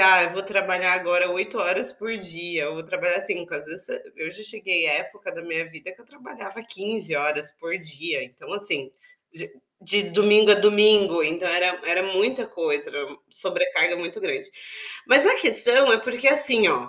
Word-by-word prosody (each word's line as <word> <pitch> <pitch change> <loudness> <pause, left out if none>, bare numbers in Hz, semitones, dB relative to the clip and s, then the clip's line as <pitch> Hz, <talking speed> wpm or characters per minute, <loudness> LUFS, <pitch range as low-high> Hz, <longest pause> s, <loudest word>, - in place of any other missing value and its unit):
ah 190 -1 +8
eu 175 - -2
vou 190 +2 -5
trabalhar 190 -2 +1
agora 180 0 +1
8 190 +2 -3
horas 180 +1 -1
por 225 +2 -7
dia, 175 -4 -5
eu 150 - -6
vou 160 - -9
trabalhar 175 +1 -2
5 175 0 -5
às 145 - -7
vezes 170 +4 -8 0.3
eu 160 - -6
já 195 +5 -11
cheguei 195 -7 -1
a 150 - +2
época 205 +7 -6
da - - -9
minha 165 -1 -4
vida 165 +3 -12
que 185 - -21
eu - - -22
trabalhava 230 -6 -13
15 205 -4 -6
horas 150 0 -2
por 165 +4 -6
dia, 160 -1 -5
então, 125 0 -14
assim, 200 -10 -3 0.4
de 415 +1 -11 0.3
de 200 +2 0
domingo 210 +2 +4
a - - +9
domingo, 205 -4 +4
então, 165 +4 -2
era 180 +1 +1
era 175 +2 +1
muita 200 +7 -1
coisa, 455 -2 -3
era 480 - -6 0.2
sobrecarga - - 0
muito 175 - -7
grande. 415 -1 -5 0.6
Mas - - +7
a - - +6
questão 265 - +4
é 225 - +5
porque, 245 +3 -4
assim, 270 -6 +6
ó, 125 0 -1
190 Hz, 190 wpm, -22 LUFS, 170-215 Hz, 0.6 s, a